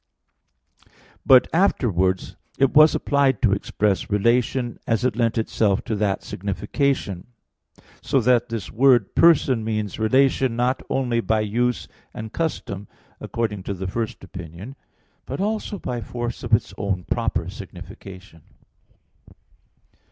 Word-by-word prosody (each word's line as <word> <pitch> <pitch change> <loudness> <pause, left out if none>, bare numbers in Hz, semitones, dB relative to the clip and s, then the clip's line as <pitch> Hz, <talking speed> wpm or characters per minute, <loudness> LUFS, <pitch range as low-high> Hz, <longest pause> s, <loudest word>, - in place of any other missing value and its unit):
But 130 -1 +7
afterwards 95 - +1 0.2
it 135 -1 +2
was 155 +1 +7
applied 140 -2 +2
to 115 - +4
express 100 0 -1
relation, 120 +3 +1
as 115 +2 +1
it 125 - +1
lent 115 -1 0
itself 110 -2 +1
to 115 - -2
that 100 -2 -1
signification, 100 - -2 0.7
so 135 - +1
that 120 0 +2
this 115 -4 -5
word 120 -3 +4
"person" 135 -8 +4
means 110 -2 -3
relation 130 +2 +2
not 125 +2 0
only 120 -3 0
by 110 -1 +1
use 120 +4 -1 0.3
and 110 0 -7
custom, 105 - -3 0.3
according 110 -4 -3
to 100 +1 -4
the 95 +1 -5
first 110 +3 -4
opinion, 90 - -9 0.5
but 135 - -5
also 210 0 -2
by 125 -8 -4
force 120 +2 -5
of 120 - -6
its 95 -3 -4
own 95 -3 -2
proper 95 -7 -1
signification. 95 -3 -11
115 Hz, 125 wpm, -23 LUFS, 100-125 Hz, 0.7 s, But